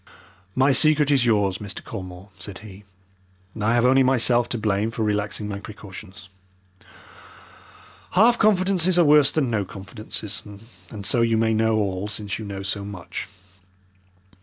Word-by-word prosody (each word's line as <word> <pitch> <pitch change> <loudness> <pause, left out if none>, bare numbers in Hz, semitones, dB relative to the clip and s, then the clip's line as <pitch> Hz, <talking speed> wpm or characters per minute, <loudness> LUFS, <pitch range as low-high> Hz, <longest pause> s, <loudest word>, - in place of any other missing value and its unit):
"My 135 +2 +4
secret 150 +1 +4
is 130 -4 +3
yours, 100 -4 +1
Mr. 100 -2 -7
Colmore," 95 -2 -9
said 95 +2 -7
he. 100 0 -13 0.8
"I 115 +3 +2
have 120 0 +3
only 130 +1 +5
myself 120 -2 +2
to 120 - -2
blame 105 0 0
for 115 0 -3
relaxing 105 0 -2
my 100 -1 -5
precautions. 100 -2 -11 1.9
Half 235 +6 +4
confidences 185 -3 +2
are 175 - +5
worse 145 -1 +6
than 140 -6 -1
no 105 -3 0
confidences, 100 +2 -6 0.5
and 100 -3 -8
so 120 - +2
you 115 -1 +2
may 110 0 +2
know 110 0 +2
all 100 -2 -1
since 105 -2 -5
you 110 - -6
know 100 -1 -6
so 100 +1 -1
much. 100 -3 -7
110 Hz, 150 wpm, -23 LUFS, 100-130 Hz, 1.9 s, worse